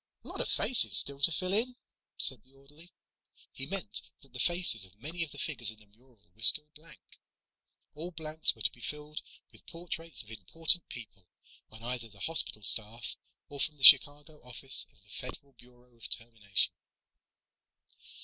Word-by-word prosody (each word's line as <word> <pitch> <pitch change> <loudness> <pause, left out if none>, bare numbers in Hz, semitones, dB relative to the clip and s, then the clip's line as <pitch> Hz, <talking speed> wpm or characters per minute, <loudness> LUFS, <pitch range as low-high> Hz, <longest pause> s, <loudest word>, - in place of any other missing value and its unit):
"Lot - - 0
of - - +1
faces 255 - +2
still 140 0 +2
to 155 - +4
fill 185 +3 -2
in," 245 +4 -1 0.4
said 130 -4 +2
the 130 +3 -26
orderly. 145 +6 -18 0.6
He - - -7
meant - - -5 0.2
that - - -23
the - - -10
faces 175 - +1
of 95 0 -15
many 165 +7 -8
of 165 - -8
the 145 - -13
figures 135 -8 -4
in 110 -1 -8
the 110 - -20
mural 115 +3 -28
were 110 - -21
still 150 +6 +9
blank. 160 +2 -19 0.7
All 165 +4 -8
blanks 160 -2 -2
were 110 - -11
to - - +1
be 120 - -18
filled 150 +2 -7 0.3
with - - -17
portraits 165 -4 -4
of 110 - -16
important 160 - +3
people 100 -6 -12 0.4
on 110 +1 -11
either 120 -1 -4
the 100 -2 -16
hospital 160 -9 -1
staff 110 +3 +3 0.3
or 145 - -11
from 155 +2 -2
the 140 - -14
Chicago 145 +3 +5
Office 125 +2 -1
of 100 - -22
the 105 - -18
Federal 140 +2 -9
Bureau 125 0 -21
of 115 - -8
Termination. 110 -4 -2
135 Hz, 175 wpm, -29 LUFS, 115-155 Hz, 0.7 s, still